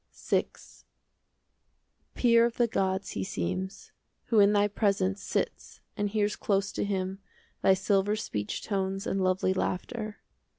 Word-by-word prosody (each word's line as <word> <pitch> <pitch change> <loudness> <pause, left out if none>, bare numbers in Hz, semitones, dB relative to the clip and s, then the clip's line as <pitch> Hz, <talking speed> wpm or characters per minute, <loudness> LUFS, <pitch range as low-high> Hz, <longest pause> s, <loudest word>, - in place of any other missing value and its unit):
VI - - +1 1.7
Peer 235 -2 +5
of 235 - -7
the 240 - +4
gods 190 -3 -1
he 95 - -3
seems, 140 - -4 0.4
Who 225 - +4
in 200 0 +6
thy 205 0 +4
presence 200 -2 0
Sits - - -3 0.2
and 205 0 -1
hears 210 0 0
close 200 0 0
to - - -2
him 190 -1 -2 0.4
Thy 190 - +5
silver 195 +2 +1
speech 105 - -4
tones 195 -1 -2
And 195 - -1
lovely 185 0 +2
laughter. 215 +3 -3
195 Hz, 135 wpm, -29 LUFS, 190-210 Hz, 1.7 s, in